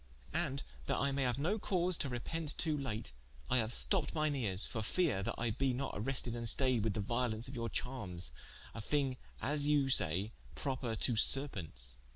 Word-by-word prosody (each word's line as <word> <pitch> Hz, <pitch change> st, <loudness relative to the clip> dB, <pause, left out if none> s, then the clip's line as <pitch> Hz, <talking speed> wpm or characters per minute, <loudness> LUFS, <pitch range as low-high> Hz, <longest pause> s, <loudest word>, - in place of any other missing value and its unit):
And -, -, +1 dB, 0.2 s
that -, -, +1 dB
I 140 Hz, 0 st, +2 dB
maye 135 Hz, -1 st, +1 dB
haue 125 Hz, -1 st, +1 dB
no 180 Hz, +10 st, +1 dB
cause 180 Hz, -2 st, +1 dB
to 140 Hz, -, -2 dB
repent 150 Hz, +5 st, -3 dB
to 155 Hz, -2 st, +1 dB
late, 115 Hz, -, -3 dB, 0.4 s
I 130 Hz, -, +5 dB
haue 110 Hz, -, +2 dB
stopped 165 Hz, -, +2 dB
mine 155 Hz, -2 st, +2 dB
eares 105 Hz, -7 st, -1 dB
for 110 Hz, -, -3 dB
feare, 135 Hz, -, +2 dB
that -, -, -2 dB
I 115 Hz, 0 st, 0 dB
be 130 Hz, +3 st, +1 dB
not 135 Hz, +2 st, -2 dB
arested 120 Hz, +1 st, 0 dB
and 115 Hz, -1 st, -1 dB
stayed 130 Hz, -4 st, +2 dB
with 110 Hz, -3 st, 0 dB
the 105 Hz, -, 0 dB
violence 120 Hz, +2 st, 0 dB
of 130 Hz, -, -7 dB
your 115 Hz, -3 st, -2 dB
charmes, 95 Hz, -, -2 dB, 0.4 s
a 110 Hz, -, -5 dB
thing 135 Hz, +2 st, +1 dB, 0.3 s
as 145 Hz, +1 st, +3 dB
you 145 Hz, -2 st, +4 dB
say 95 Hz, -1 st, +2 dB, 0.2 s
proper 130 Hz, -4 st, -2 dB
to 120 Hz, +2 st, +2 dB
Serpentes. 80 Hz, -, 0 dB
125 Hz, 195 wpm, -36 LUFS, 110-140 Hz, 0.4 s, I